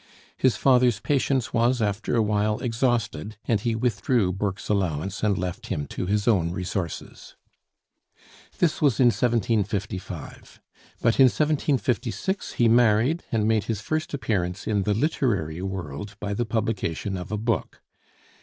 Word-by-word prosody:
His 130 -5 +2
father's 125 -3 +3
patience 135 -2 0
was 120 +2 +2
after 105 +1 -1
a 115 - +3
while 105 0 +1
exhausted, 115 - -1
and 115 -3 +2
he 115 +2 -1
withdrew 110 -3 +1
Burke's 100 0 -3
allowance 95 -2 -1
and 105 -3 +2
left 90 -1 -4
him 75 - -2
to 90 - -4
his 105 +1 0
own 95 -8 +3
resources. 90 -1 -5 1.2
This 170 -4 +1
was 140 -6 +3
in 125 -2 +6
1755, 105 -7 -2 0.4
but 115 +2 +2
in 135 - +9
1756 140 - 0
he 120 - +3
married, 120 +7 +3
and 110 -2 +1
made 110 -2 +2
his 110 -3 -2
first 155 +8 -2
appearance 95 -8 -2
in 105 -2 +1
the 105 +1 0
literary 105 - 0
world 95 0 -5
by 100 -1 -3
the 120 +4 -1
publication 105 -4 -2
of 90 +2 -6
a 105 - -1
book. 110 -3 -2
110 Hz, 145 wpm, -25 LUFS, 95-120 Hz, 1.2 s, in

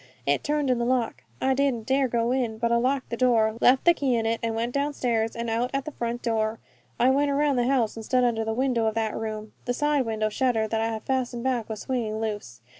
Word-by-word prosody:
It 140 0 +1
turned 295 -2 +1
in 245 - +1
the - - 0
lock. 240 - -1
I 265 - +2
didn't 260 -4 0
dare 265 +1 +2
go 235 0 0
in, 245 -4 -1
but 235 +1 0
I 235 - +4
locked 260 +1 0
the - - 0
door, 225 -3 +3
left 260 +1 +5
the 345 - +7
key 270 -6 0
in 225 -1 0
it, 225 0 0
and 230 -1 -1
went 230 +2 -1
downstairs 250 -6 0
and 235 0 -3
out 230 +2 0
at 275 - -1
the 305 - -5
front 240 -2 -4
door. 220 -1 0 0.4
I 255 +2 +5
went 285 +2 +2
around 285 -1 +2
the 245 0 +2
house 255 -5 +1
and 225 - -7
stood 250 +2 +2
under 230 -2 +1
the 220 - -2
window 240 -1 +1
of 220 - -1
that 220 -1 -1
room. 215 -1 -5
The 245 - -1
side 295 -3 +1
window 215 -1 0
shutter 225 -1 +1
that 220 +1 -1
I 225 - +1
had 220 -1 -4
fastened 250 -2 -2
back 250 -4 -1
was 215 -2 -5
swinging 225 -4 -2
loose. 205 - -5
235 Hz, 255 wpm, -26 LUFS, 225-260 Hz, 0.4 s, the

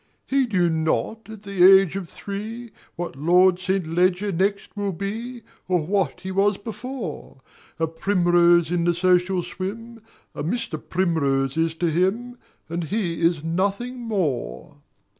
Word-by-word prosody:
He 270 -1 +1
knew 185 -6 +2
not, 165 +7 -1
at 220 -2 -10
the 195 -3 +1
age 190 -2 +7
of 190 -4 -5
three, 220 +4 -7 0.2
What 175 -4 -5
Lord 180 +5 +4
St. 190 -1 -1
Leger 180 +4 +1
next 195 +4 -1
will 200 -2 -2
be 225 +6 -5 0.2
Or 180 -4 +1
what 180 -3 -1
he 190 0 -5
was 195 +1 +2
before; 220 - -7 0.4
A 160 - +1
Primrose 175 -1 +3
in 175 -1 +1
the 175 0 +2
social 180 0 +2
swim 225 +6 -7 0.3
A - - -5
Mr. 170 -3 -3
Primrose 140 -7 0
is 165 0 0
to 170 0 0
him, 220 +9 -1 0.3
And 170 +1 -3
he 175 -3 -2
is 165 -2 +2
nothing 200 +9 -1
more. 150 - -3
185 Hz, 145 wpm, -23 LUFS, 170-205 Hz, 0.4 s, age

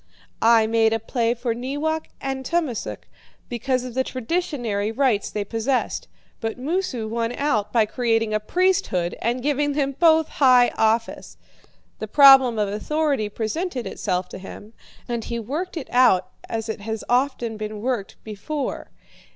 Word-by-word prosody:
I 225 -1 +5
made 225 0 +2
a 225 - 0
play 235 +1 -1
for 240 -1 -2
Neewak 290 +6 -2
and 270 -1 -4
Tummasook, 310 -6 -2 0.4
because 255 +1 -1
of 250 -1 -7
the 260 +2 +1
traditionary 245 - -2
rights 235 -4 +1
they 210 - -3
possessed; 230 +5 -1 0.3
but 225 0 -3
Moosu 270 - -2
won 230 +1 -2
out 225 -8 0
by 225 -3 +3
creating 225 -1 0
a 215 - +2
priesthood 215 - 0
and 240 +2 -1
giving 290 0 +1
them 280 -1 0
both 320 -2 +5
high 250 -3 +5
office. 225 +1 -1 0.6
The - - -4
problem 270 -4 +7
of 210 -1 +1
authority 275 +2 -1
presented 250 - -3
itself 180 -1 -2
to - - -8
him, 205 +3 -11 0.3
and 235 -2 -3
he 235 - -3
worked 305 - -4
it 300 - -5
out 245 -7 +4 0.2
as 225 0 -3
it 220 -1 -5
has 220 +1 -4
often 245 -2 0
been 215 0 -5
worked 235 -3 -3
before. 265 +7 -5
240 Hz, 150 wpm, -23 LUFS, 220-275 Hz, 0.6 s, problem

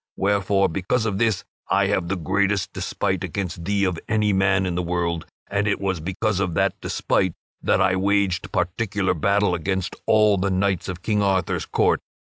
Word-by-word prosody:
Wherefore, 100 0 +2
because 100 +7 -1
of 100 -3 -1
this, 110 -5 +1 0.3
I 100 +2 +3
have 95 -3 0
the 95 - -1
greatest 100 +2 0
despite - - -2
against 90 -4 -4
thee 100 +1 +1
of 90 -3 0
any 105 -2 +2
man 95 0 +2
in 90 - -1
the 90 - -1
world, 85 -1 -2 0.2
and 100 +1 0
it 105 - +1
was 95 -3 -1
because 95 +4 -1
of 90 -4 -1
that 95 -1 +2
despite 95 -3 0 0.3
that - - +2
I 95 0 +3
waged 95 -2 +1
particular 95 +1 0
battle 100 +3 +2
against 95 +2 -2
all 105 -2 +4
the 100 +2 0
knights 95 -1 0
of 90 -1 -6
King 105 0 +1
Arthur's 95 -2 0
court. - - +2
95 Hz, 180 wpm, -23 LUFS, 90-100 Hz, 0.3 s, all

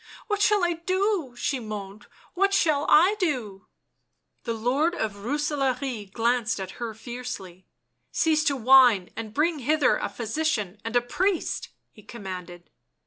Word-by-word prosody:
u - - -25 0.2
What 415 -1 0
shall 415 -2 +3
I 345 0 +2
do 365 - -1
!" - - -19
she 285 0 -1
moaned. 210 -2 -7
" - - -28
What 395 +1 +2
shall 295 -3 +2
I 365 +7 +6
do!" 240 - -2 0.8
The 230 - -1
Lord 270 +10 +1
of 220 -8 -2
Rooselaare 265 -3 -2
glanced 230 -1 0
at 190 -1 -5
her 225 -2 -4
fiercely. 220 -7 -8 0.2
" - - -50
Cease 310 -1 +2
to 280 -3 +2
whine 245 -6 +5
and 225 -1 -6
bring 305 +6 +1
hither 295 +2 +2
a - - -3
physician 220 - -2
and 225 +1 -5
a 245 - +5
priest," 360 +9 -1 0.2
he 215 - -16
commanded. 180 -5 -9
250 Hz, 160 wpm, -26 LUFS, 215-310 Hz, 0.8 s, I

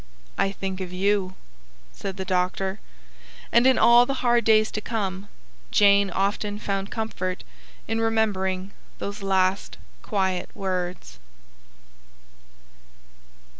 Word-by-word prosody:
"I 195 - +1
think 190 -1 -5
of 180 -1 -5
YOU," 190 0 0 0.6
said 195 -1 -6
the 190 - -4
doctor. 190 +2 -1 0.7
And 235 +2 +5
in 260 - +5
all 240 +1 +6
the 270 -2 -3
hard 240 -1 +3
days 215 -1 +4
to 215 - -3
come, 200 -3 -3 0.4
Jane 200 -1 +5
often 205 +2 -1
found 195 -1 -3
comfort 195 -5 -4 0.4
in 225 +1 -1
remembering 200 -4 0 0.3
those 200 +1 -5
last 190 0 0 0.2
quiet 190 -4 -1
words. 180 - -4
195 Hz, 110 wpm, -25 LUFS, 185-215 Hz, 0.7 s, all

